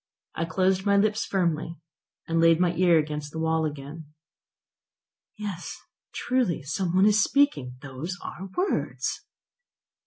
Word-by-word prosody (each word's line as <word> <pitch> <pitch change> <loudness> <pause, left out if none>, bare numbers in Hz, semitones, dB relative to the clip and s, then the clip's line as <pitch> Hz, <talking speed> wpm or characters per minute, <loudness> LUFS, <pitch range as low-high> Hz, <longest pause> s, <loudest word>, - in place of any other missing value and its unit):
I 165 - -2
closed 185 +3 +1
my 200 0 +3
lips 215 +2 +2
firmly, 170 -3 -1 0.5
and 165 0 +1
laid 165 0 +5
my 175 -1 +2
ear 175 -1 +4
against 150 -1 -2
the 160 - -7
wall 160 0 +1
again. 150 +2 -6 1.3
"Yes, 200 -5 -5 0.3
truly, 245 - 0
some 175 +5 -2
one 190 +2 +5
is 210 0 +5
speaking; 265 - +2
those 145 +7 -5
are 190 +2 -7
words!" 380 +2 -1
170 Hz, 130 wpm, -26 LUFS, 160-195 Hz, 1.3 s, laid